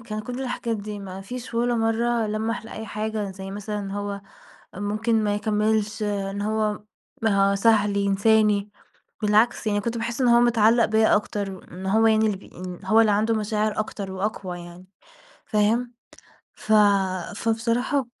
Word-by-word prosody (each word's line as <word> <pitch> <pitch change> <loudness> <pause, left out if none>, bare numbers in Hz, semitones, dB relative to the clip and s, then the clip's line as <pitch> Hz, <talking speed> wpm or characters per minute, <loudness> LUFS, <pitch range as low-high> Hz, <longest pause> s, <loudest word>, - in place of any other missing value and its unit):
كان 215 -2 -5
كُل 250 +4 -5
الحاجات 245 -3 -2
دي، 210 0 -6
ما 190 -1 -8
فيش 245 +4 -8
ولا 240 +1 +1
مرة 225 0 +1
لمّح 220 +2 -2
لأي 220 0 -7
حاجة 215 -1 -3
زي 190 0 -8
مثلًا 210 +1 -4
إن 195 -1 -5
هو 200 0 -4 0.5
ممكن 215 +3 0
ما 205 0 +1
يكملش، 210 0 0
إن 200 -1 -2
هو 215 0 -1 0.7
سهل 205 -1 +3
ينساني، 205 +1 +2 0.5
بالعكس، 215 +2 +2
يعني 205 -1 +1
كنت 235 +2 -3
باحس 235 +3 -3
إن 250 - +3
هو 235 0 +6
متعلق 235 -1 +4
بيَّ 220 0 +3
أكتر 205 -2 +1
وإن 185 0 -10
هو 220 +4 +3
يعني 220 0 +4
اللي 210 -3 0
بي - - -16
إن 180 0 -7
هو 215 +4 +4
اللي 220 -2 +3
عنده 215 +3 +2
مشاعر 215 0 -1
أكتر 200 -2 -4
وأقوى 190 -2 -4
يعني، 175 +1 -11 0.6
فاهم؟ 230 +3 +1 0.6
ف 215 - -4 0.6
فبصراحة 230 +4 0
215 Hz, 155 wpm, -24 LUFS, 200-225 Hz, 0.7 s, هو